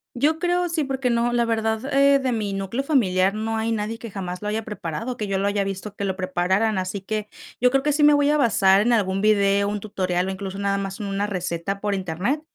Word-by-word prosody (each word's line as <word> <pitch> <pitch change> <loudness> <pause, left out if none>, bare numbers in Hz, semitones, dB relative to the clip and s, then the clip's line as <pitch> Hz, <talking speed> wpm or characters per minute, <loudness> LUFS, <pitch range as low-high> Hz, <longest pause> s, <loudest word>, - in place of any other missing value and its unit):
Yo 300 +6 +1
creo, 355 0 +1
sí, 325 -2 0
porque 265 -2 -1
no, 235 +1 +1
la 240 0 +2
verdad, 225 +3 -1
eh, 280 0 +5
de 265 -2 -1
mi 215 -4 -2
núcleo 195 +7 -3
familiar 195 -9 +2
no 220 +1 -2
hay 220 +1 -1
nadie 225 +1 -2
que 230 - -7
jamás 180 -3 -5
lo 210 - -4
haya 215 +1 -1
preparado, 210 +4 -5
que 215 -4 -4
yo 195 -1 -1
lo 195 +1 0
haya 200 0 +1
visto 195 +1 -5
que 200 - -3
lo 190 -1 -1
prepararan, 185 +3 0
así 185 +2 -4
que, 210 +1 -4 0.3
yo 250 - +5
creo 270 +1 +1
que 295 - +2
sí 295 +1 +2
me 295 0 +7
voy 290 0 +3
a 300 - +3
basar 200 -7 +4
en 240 +3 +2
algún 195 -3 +1
video, 200 -1 +3
un 205 0 -2
tutorial, 185 -3 -2
o - - -2
incluso 190 0 -6
nada 200 0 0
más 195 +1 -5
en 210 - -4
una 200 +1 -1
receta 180 0 -3
por 205 -1 -1
Internet. 190 - -2
210 Hz, 250 wpm, -23 LUFS, 195-240 Hz, 0.3 s, me